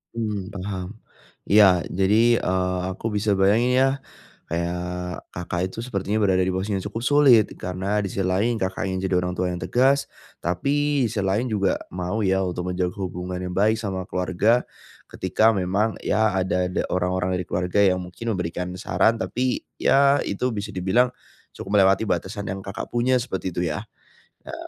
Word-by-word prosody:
Mmm, 105 -3 -3
paham. 95 +1 -6 0.5
Iya 95 -4 +5
jadi, 105 +6 +3
eee, 90 0 0
aku 95 +4 -4
bisa 105 0 +1
bayangin 110 +6 +3
ya 135 - +5 0.6
kayak 85 +1 -1 0.5
Kakak 90 0 -4
itu 115 - -8
sepertinya 105 -3 -2
berada 95 -3 +3
di 95 - 0
posisi 95 +3 -2
yang 95 - -3
cukup 110 +3 -5
sulit 135 -7 +6
karena 95 +3 -2
di 95 - -4
sisi - - -4
lain 110 +5 +1
Kakak 95 0 -2
ingin 95 0 -2
jadi 95 - 0
orang 90 0 -2
tua 90 - 0
yang 90 - -4
tegas. 130 +9 +2 0.3
Tapi 140 - +1
si 110 -1 -3
lain 100 +6 0
juga 100 -5 0 0.2
mau 90 +4 -2
ya 95 0 +2
untuk 90 0 -3
menjaga 90 0 -1
hubungan 90 -1 -4
yang 90 0 -5
baik 110 +3 +2
sama 95 -4 -3
keluarga. 95 +7 +1 0.4
Ketika 110 +1 +2
memang 100 +4 0
ya 110 -2 +2
ada 90 -1 0
ada 90 - -1
orang-orang 90 0 0
dari 90 - -4
keluarga 90 +3 -1
yang 90 -2 +3
mungkin 90 +6 -5
memberikan 90 0 -3
saran, 115 +3 +2
tapi 125 +2 -1 0.2
ya 140 +1 +4
itu 125 +5 -1
bisa 100 0 -4
dibilang 95 +8 +3 0.5
cukup 100 +1 0
melewati 95 +2 +4
batasan 100 +3 -2
yang 95 - -4
Kakak 100 +3 -6
punya 125 +2 +2
seperti 95 -7 -4
itu 90 - 0
ya. 75 - -5 0.6
Ya. - - -8
95 Hz, 170 wpm, -23 LUFS, 90-110 Hz, 0.6 s, sulit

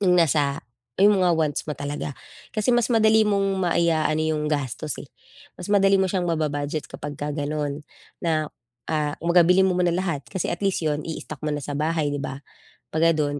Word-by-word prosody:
'yung 180 -2 +4
nasa 145 -3 +2 0.4
'yong 205 +2 +6
mga 180 - +4
wants 155 -3 0
mo 150 - -3
talaga. 145 -2 -4 0.3
Kasi 215 +3 +1
mas 240 -1 +2
madali 220 -1 +5
mong 195 -2 +1
maiaano 160 -2 +2
'yong 155 -1 0
gastos, 145 0 -2
eh, - - -8 0.5
mas 180 - -8
madali 195 -1 +4
mo 190 - +2
siyang 185 -3 0
maba-budget 150 -2 -2
kapagka 145 0 -5
gano'n 145 0 -3 0.4
na, 155 -2 +1 0.4
ah, 150 -2 0
kumbaga 170 0 +5
bilhin 190 +1 +5
mo 180 - 0
muna 175 -1 +2
lahat 170 -6 -2
kasi 190 -3 -3
at - - -2
least 195 - 0
'yon 150 -1 -1
i-istock 155 -2 -6
mo 150 - 0
na 145 - -3
sa 145 0 -4
bahay 155 -1 0
'di 145 - -2
ba. 140 0 -5 0.5
'Pag 165 0 +3
ganon 145 -1 -1
155 Hz, 190 wpm, -24 LUFS, 145-180 Hz, 0.5 s, yong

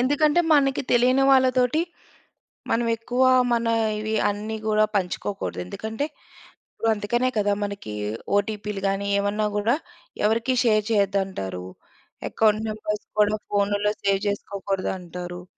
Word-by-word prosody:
ఎందుకంటే, 295 +5 +3
మనకి 275 -2 +2
తెలియని 255 +3 +4
వాళ్ళతోటి, 255 +2 +3 0.9
మనం 235 +1 +2
ఎక్కువ 245 +3 0 0.3
మన 235 0 +1 0.3
ఇవి 215 +1 -3 0.2
అన్నీ 215 +2 -4
కూడా 215 0 +4
పంచుకోకూడదు. 195 - -2
ఎందుకంటే, 220 - -4 0.7
ఇప్పుడు 225 - -1
అందుకనే 240 +5 0
కదా, 205 -1 +2
మనకి 200 - -5 0.4
ఓటీపీలు 205 -1 -3
గాని 195 +1 -2
ఏవన్నా 205 +1 0
కూడా 225 +6 +2 0.5
ఎవరికీ 230 +4 +1
షేర్ 215 -2 +3
చేయద్దంటారు. 190 - -1 0.6
ఎకౌంట్ 215 0 +2
నంబర్స్ 210 -1 -4
కూడా 210 0 +4
ఫోన్‌లలో 205 +1 +1
సేవ్ 195 -1 +2
చేసుకోకూడదు 200 -1 -3
అంటారు. 175 0 -7
210 Hz, 115 wpm, -24 LUFS, 200-235 Hz, 0.9 s, తెలియని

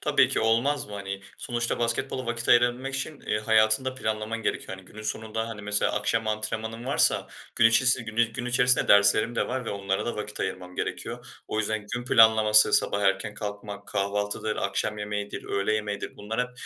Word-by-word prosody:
Tabii - - +3
ki, - - 0
olmaz 120 +6 +1
mı 105 - -12
hani? 100 -1 -5 0.2
Sonuçta 120 -1 -2
basketbola 125 +2 -2
vakit 120 0 -3
ayırabilmek 120 +3 +3
için, 140 +2 -4
eee, 105 - -1
hayatını 110 +2 +3
da 130 - -2
planlaman 110 -1 -3
gerekiyor. 95 - -2
Hani, 95 - -14
günün 110 +3 -11
sonunda, 110 +1 -3
hani, 105 -2 -7
mesela 105 0 0
akşam 110 +2 0
antrenmanın 110 +2 -3
varsa 135 - +2 0.3
gün 115 - +6
içisi 125 +1 +3
gün 115 0 0
gün 125 +1 -5
içerisinde 125 +1 +3
derslerim 100 +3 +5
de - - 0
var 130 0 -3
ve - - -4
onlara 100 -1 -2
da 120 - -3
vakit 105 0 -6
ayırmam 90 0 -4
gerekiyor. - - -4 0.2
O 110 - -2
yüzden 110 -1 -2
gün 120 0 -4
planlaması 110 -3 +6
sabah 100 - +2
erken 95 +2 +1
kalkmak, 100 -1 -7
kahvaltıdır, 105 +1 -2
akşam 105 0 -2
yemeğidir, 105 0 -4
öğle 100 +2 -1
yemeğidir. 105 -1 -4
Bunlar 110 +3 -3
hep 125 0 -2
110 Hz, 185 wpm, -26 LUFS, 105-120 Hz, 0.3 s, gün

